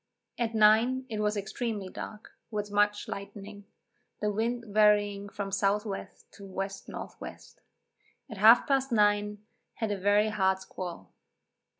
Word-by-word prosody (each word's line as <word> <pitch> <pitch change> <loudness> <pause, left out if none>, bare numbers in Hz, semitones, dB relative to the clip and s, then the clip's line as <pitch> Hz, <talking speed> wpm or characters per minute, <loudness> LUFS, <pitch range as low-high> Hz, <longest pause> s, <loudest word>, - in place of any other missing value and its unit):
At 230 -1 -1
nine 225 +5 +4
it 215 -2 -3
was 210 0 0
extremely 205 0 -3
dark, 210 +3 -8 0.2
with 210 -2 -4
much 205 0 +2
lightning, 200 0 -8 0.5
the 210 0 0
wind 235 +3 -1
varying 205 -1 +3
from 200 0 -5
S. 195 - -1
W. 200 +1 +3 0.5
to 200 - -12
W. 190 - -7
N. 195 - -4 0.2
W. - - -7 0.9
At 220 -6 -9
half 225 +5 +7
past 270 -1 +1
nine, 210 -1 +2 0.3
had 220 -3 -2
a 205 - -1
very 205 +2 +3
hard 190 -3 +2
squall. 175 - -8
210 Hz, 140 wpm, -29 LUFS, 200-220 Hz, 0.9 s, half